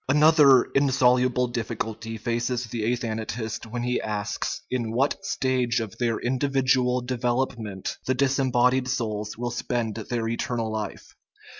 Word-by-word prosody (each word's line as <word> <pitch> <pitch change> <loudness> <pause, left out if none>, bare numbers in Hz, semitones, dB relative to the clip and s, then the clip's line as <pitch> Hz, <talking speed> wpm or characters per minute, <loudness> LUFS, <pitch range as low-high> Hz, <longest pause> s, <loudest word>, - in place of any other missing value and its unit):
Another 150 -3 +6
insoluble 125 -2 +3
difficulty 115 -1 -4
faces 120 +2 -1
the 115 0 -1
athanatist 110 -1 -3
when 120 +2 -4
he 125 0 0
asks 105 0 -3
in 120 -3 -1
what 135 +10 0
stage 130 - 0
of 110 -4 -5
their 115 -2 0
individual 130 -1 +1
develop 125 +1 -1
ment 100 -4 -5
the 130 - +2
disembodied 130 -1 +2
souls 110 -5 -2
will 120 +1 -3
spend 120 -2 -2
their 115 +1 -3
eternal 115 -1 -2
life. 110 -2 -5
120 Hz, 130 wpm, -25 LUFS, 115-130 Hz, -, Another